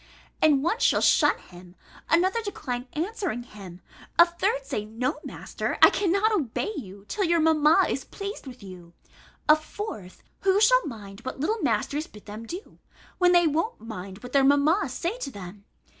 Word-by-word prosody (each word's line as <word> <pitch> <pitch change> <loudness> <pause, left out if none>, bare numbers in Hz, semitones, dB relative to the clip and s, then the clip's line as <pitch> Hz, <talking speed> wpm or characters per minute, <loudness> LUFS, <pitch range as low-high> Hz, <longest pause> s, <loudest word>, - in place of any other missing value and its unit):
And 290 -3 +4
one 385 +9 0
shall - - +3
shun - - +4
him, 175 0 -14 0.3
another 375 +7 +3
decline 255 - -5
answering 350 - -3
him, 195 -6 -12 0.4
a 340 - +9
third 340 -5 -1
say, 265 -7 -3
"No, 235 +7 -3
master, - - -4
I - - +8
cannot 400 +3 +2
obey 350 - -1
you, 200 -6 -9
till 410 - -1
your 340 -2 +2
mamma 320 +2 +4
is - - -2
pleased 395 - -7
with 250 -4 -10
you"; 180 -3 -12 0.5
a 305 - +8
fourth, 310 - -8 0.2
"Who 390 0 +3
shall - - +4
mind 205 -6 -9
what 260 +2 -7
little 425 +10 -1
masters 300 +3 -1
bid 210 - -15
them 215 +2 -8
do, 360 - -9 0.4
when 360 -1 +5
they 350 -1 +5
won't 330 +10 0
mind 195 -2 -8
what 250 - -8
their 275 -1 +5
mammas 285 +4 +3
say 350 - -3
to 275 - -4
them?" 200 -3 -10
290 Hz, 175 wpm, -26 LUFS, 215-360 Hz, 0.5 s, a